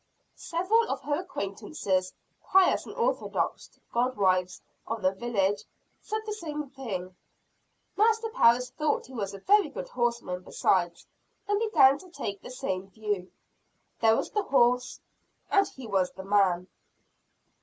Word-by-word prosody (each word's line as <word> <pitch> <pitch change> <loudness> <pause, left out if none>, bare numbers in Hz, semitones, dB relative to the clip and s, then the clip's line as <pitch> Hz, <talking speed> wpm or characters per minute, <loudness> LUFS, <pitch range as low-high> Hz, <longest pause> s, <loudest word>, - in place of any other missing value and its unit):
Several 400 +7 +1
of - - -3
her 290 +1 0
acquaintances, 200 - -2 0.3
pious 380 -1 +3
and - - -9
orthodox - - -1 0.2
goodwives 195 -7 +1 0.3
of 225 -2 -4
the 185 - +4
village, 200 -1 0 0.4
said 435 0 -3
the 425 - -3
same 300 -8 -5
thing. 190 -9 -5 0.8
Master 450 +1 +2
Parris 250 - +4
thought 305 +3 -1
he 260 - -14
was 200 -4 -4
a 195 - -11
very 405 - +4
good 280 - -7
horseman 235 -7 -1
besides; 175 -1 0 0.4
and 410 0 +1
began 290 -11 +5
to 370 - -14
take 200 - -5
the - - -10
same 195 -7 -4
view. 205 -3 -3 0.7
There 225 0 +5
was - - -3
the 420 - +1
horse, 250 -6 +2 0.5
and 395 0 +4
he 260 - -11
was 190 -4 +1
the 190 - -9
man! 190 -3 +2
240 Hz, 140 wpm, -28 LUFS, -, 0.8 s, began